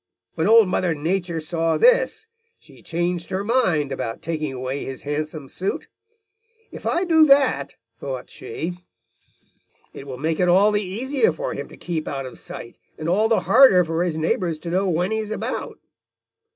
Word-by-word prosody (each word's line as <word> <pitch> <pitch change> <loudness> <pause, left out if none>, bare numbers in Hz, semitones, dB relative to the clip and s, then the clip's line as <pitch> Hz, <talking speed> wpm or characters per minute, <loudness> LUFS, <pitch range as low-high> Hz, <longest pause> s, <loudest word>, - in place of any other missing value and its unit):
"When 160 - 0
Old 225 -1 +7
Mother 180 -2 0
Nature 170 +2 -2
saw 165 +1 -1
this, - - +3 0.3
she - - -19
changed 175 +1 -2
her 190 +1 -2
mind 185 - +1
about 115 0 -4
taking 155 -3 -3
away 130 +2 -4
his 135 -1 -7
handsome 150 0 -4
suit. 190 +8 -4 0.8
'If - - -7
I 350 - +1
do 325 -3 +5
that,' 260 - +3 0.2
thought 130 -3 -5
she, 170 +9 -6 1.1
'it 135 - -10
will 130 -2 -6
make 160 +3 -1
it 180 - +3
all 195 +4 +5
the 205 0 +1
easier 260 - 0
for - - -4
him - - -6
to - - -14
keep 165 -3 -4
out 135 -1 -4
of 130 - -9
sight, 120 - -9 0.2
and 155 - -5
all 205 +6 +3
the 225 - +2
harder 235 -8 +6
for 165 0 -2
his 170 -3 -2
neighbors 165 +1 0
to 170 - -5
know 190 +2 +1
when 180 +4 0
he 220 - 0
is 215 -1 -4
about.' 220 - -4
175 Hz, 180 wpm, -22 LUFS, 155-210 Hz, 1.1 s, Old